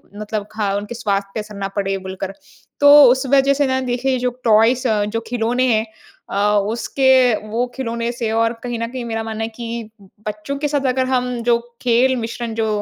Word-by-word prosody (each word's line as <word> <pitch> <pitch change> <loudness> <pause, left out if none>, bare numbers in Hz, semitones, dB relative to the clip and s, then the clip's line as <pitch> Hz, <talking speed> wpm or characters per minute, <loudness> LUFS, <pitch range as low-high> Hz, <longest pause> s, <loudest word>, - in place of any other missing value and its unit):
मतलब 210 0 -4
ख 210 -2 0
उनके 210 +4 -6
स्वास्थ्य 200 -4 -1
पे - - -3
असर 210 0 -8
ना 200 -1 -3
पड़े 195 -1 -1
बोलकर। 190 0 -6 0.5
तो 285 0 +7 0.2
उस 260 +2 0
वजह 275 0 +5
से 285 +1 +1
ना 260 0 +1
देखिए 255 +1 -1
जो 250 0 0
टॉयज़ 230 +3 +4 0.3
जो 225 - 0
खिलौने 245 +2 0
हैं 220 0 +1 0.4
अ, 205 +1 +2
उसके 255 +2 +3
वो 230 +3 -1
खिलौने 235 -2 -2
से 235 -2 -3
और 230 +1 +1
कहीं 240 -2 -3
न 230 - -2
कहीं 255 -1 -5
मेरा 225 -1 -3
मानना 220 0 -4
है 225 - -3
कि 235 -1 -6 0.4
बच्चों 210 +7 -4
के 295 +1 -1
साथ 285 -1 -1
अगर 260 0 0
हम 250 -1 0
जो 235 0 +3 0.2
खेल 250 +2 +3
मिश्रण 235 -1 -4
जो 225 -1 0
230 Hz, 195 wpm, -19 LUFS, 215-255 Hz, 0.5 s, तो